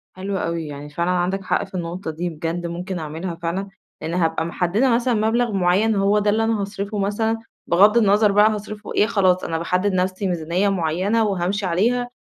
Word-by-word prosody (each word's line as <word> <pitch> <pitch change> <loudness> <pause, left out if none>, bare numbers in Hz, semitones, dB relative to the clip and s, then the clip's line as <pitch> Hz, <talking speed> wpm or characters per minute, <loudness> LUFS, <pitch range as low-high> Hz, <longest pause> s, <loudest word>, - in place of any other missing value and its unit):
حلو 190 +1 -3
أوي، 165 -2 -3
يعني 145 0 -8
فعلًا 170 +4 -2
عندك 180 +2 0
حق - - 0
في 195 - -13
النقطة 175 0 -4
دي 170 +3 -3
بجد 165 +2 -4
ممكن 175 +1 -5
أعملها 160 +3 -5
فعلًا، 170 +4 -3 0.3
لإن 160 +2 -4
هابقى 165 -2 0
محدّدة 180 +9 +1
مثلًا 245 +1 +1
مبلغ 225 +2 +1
معيّن 195 +3 +2
هو 200 +1 +3
ده 210 0 +1
اللي 220 +2 +2
أنا 225 -2 0
هاصرِفه 200 +1 -4
مثلًا 220 +3 0 0.3
بِغَض 205 +6 +5
النظر 210 -1 +4
بقى 210 +2 +5
هاصرِفه 210 0 -6
إيه 210 - +3
خلاص، 185 -5 +2
أنا 165 - -2
باحدّد 185 +4 0
نَفْسي 185 +2 0
ميزانية 175 +3 0
معيّنة 190 +5 +1
وهامشي 195 0 -1
عليها 235 +8 +1
190 Hz, 185 wpm, -21 LUFS, 170-210 Hz, 0.3 s, بِغَض